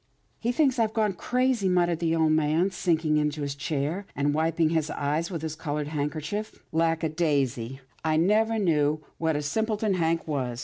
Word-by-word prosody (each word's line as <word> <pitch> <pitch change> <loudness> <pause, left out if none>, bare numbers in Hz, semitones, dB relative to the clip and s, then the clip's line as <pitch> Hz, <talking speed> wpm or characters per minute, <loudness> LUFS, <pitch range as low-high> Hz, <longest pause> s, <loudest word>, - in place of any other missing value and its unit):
" - - -42
He 240 - 0
thinks 265 -1 +2
I've 220 -1 +1
gone 215 -3 +2
crazy," 250 +1 +1
muttered 175 -2 +2
the 165 -1 +1
old 160 -1 +3
man, 155 +4 +2
sinking 160 -4 +1
into 150 0 0
his 140 -1 -2
chair, 150 +6 -2
and 145 +1 +1
wiping 160 +1 +2
his 160 -2 0
eyes 150 +4 -1
with 165 -4 -5
his 155 -1 -3
coloured 150 -2 -3
handkerchief. 155 +8 -3
" - - -40
Lack 165 0 +1
a 160 - +1
daisy! 135 -6 -1 0.2
I 155 -1 +2
never 215 +6 +3
knew 155 -6 +1 0.2
what 160 -1 +1
a 145 - -1
simpleton 215 +5 0
Hank 165 -2 0
was. 130 -5 -2
160 Hz, 190 wpm, -27 LUFS, 150-185 Hz, 0.2 s, old